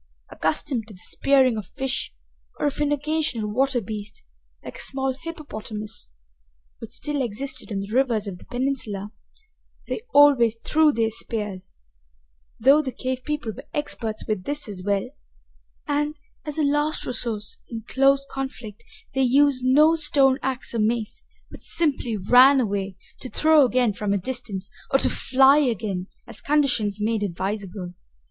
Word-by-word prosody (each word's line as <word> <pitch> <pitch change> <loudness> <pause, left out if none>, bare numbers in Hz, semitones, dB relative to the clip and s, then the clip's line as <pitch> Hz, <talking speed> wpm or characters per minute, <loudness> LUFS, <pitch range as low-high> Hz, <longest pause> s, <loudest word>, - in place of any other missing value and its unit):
Accustomed 225 - -1
to 215 - -11
the - - -14
spearing 265 +1 +2
of 205 -4 -5
fish 270 -2 -3 0.5
or - - -1
of 285 -1 -1
an 295 0 +1
occasional 295 -6 -1
water 260 +4 +1
beast, 210 -1 -7 0.4
like - - -8
a - - -5
small 265 0 -1
hippopotamus, 220 - -7 0.7
which - - -8
still 295 -2 -2
existed 250 +3 -4
in 200 -3 -2
the 200 +1 -7
rivers 240 -5 +2
of 190 -3 -6
the - - -15
peninsula, 245 -6 -3 0.8
they - - -3
always 275 -6 +6
threw 305 +6 +3
their 225 -4 0
spears 210 - -5 0.8
though 275 +6 +6
the 270 -3 -4
cave 255 0 -4
people 300 -6 -3
were 270 - -11
experts 230 -7 -3
with 210 -4 -2
this 290 -1 -2
as 200 -3 -5
well 200 +2 0 0.8
and, 295 +1 -1 0.3
as 300 - -4
a 310 - +2
last 295 +2 +1
resource 225 -4 -3
in 225 -2 -6
close 275 +1 +3
conflict, 250 -6 -6 0.3
they 270 - +1
used 265 0 +4
no 295 +5 +5
stone 280 -4 +3
ax 260 -2 -3
or 230 - -1
mace, 225 - -1 0.3
but - - -11
simply 275 -9 -1
ran 250 +8 +6
away, 200 -4 -2 0.2
to 255 - -7
throw 310 +1 +5
again 245 -3 +2
from 205 -1 -1
a - - +2
distance, 205 -3 -5 0.2
or 270 - +4
to - - +1
fly 270 +2 +4
again, 215 -9 -1 0.2
as 230 - -9
conditions 245 -9 +1
made 220 0 0
advisable. 190 -1 -4
250 Hz, 155 wpm, -24 LUFS, 210-280 Hz, 0.8 s, always